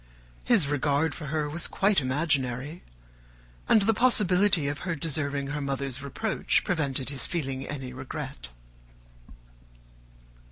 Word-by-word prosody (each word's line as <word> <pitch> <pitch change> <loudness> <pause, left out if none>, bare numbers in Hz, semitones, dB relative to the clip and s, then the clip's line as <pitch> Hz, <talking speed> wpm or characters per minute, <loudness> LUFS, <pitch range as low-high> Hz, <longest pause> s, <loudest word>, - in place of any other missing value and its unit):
His 225 - +3
regard 145 +1 +1
for 150 -1 -7
her 150 +1 -1
was 160 +3 -2
quite 195 -5 +2
imaginary; 135 +1 -1 0.9
and 215 - +6
the 225 +2 +3
possibility 200 - +3
of 145 0 -3
her 175 -2 -2
deserving 140 -2 -2
her 145 0 -3
mother's 135 -1 -2
reproach 165 - 0
prevented 140 -6 +1
his 140 - -1
feeling 135 -5 -3
any 130 -3 -6
regret. 130 - -5
145 Hz, 120 wpm, -27 LUFS, 135-170 Hz, 0.9 s, and